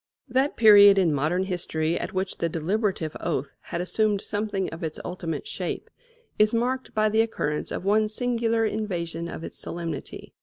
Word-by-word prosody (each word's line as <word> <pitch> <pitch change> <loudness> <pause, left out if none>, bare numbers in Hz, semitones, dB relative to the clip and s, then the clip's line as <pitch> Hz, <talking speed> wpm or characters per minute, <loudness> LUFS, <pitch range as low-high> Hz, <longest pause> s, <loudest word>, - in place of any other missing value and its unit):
That 265 +3 +1
period 205 -3 +8
in 175 -5 +3
modern 155 +6 +1
history 170 -3 -1
at - - -4
which 190 0 -3
the 170 - 0
deliberative 170 0 -1
oath 145 -4 -2
had 170 - -4
assumed 205 +3 +1
something 205 -3 -2
of 165 +2 -8
its 155 -1 -4
ultimate 175 - -4
shape - - -4 0.5
is 215 +2 +4
marked 255 +3 -1
by 215 0 +3
the 220 +1 +3
occurrence 150 -9 -2
of - - -5
one 215 +2 +3
singular 230 0 0
invasion 170 -6 -3
of 165 - -7
its - - -7
solemnity. 165 -4 -6
195 Hz, 165 wpm, -26 LUFS, 170-220 Hz, 0.5 s, period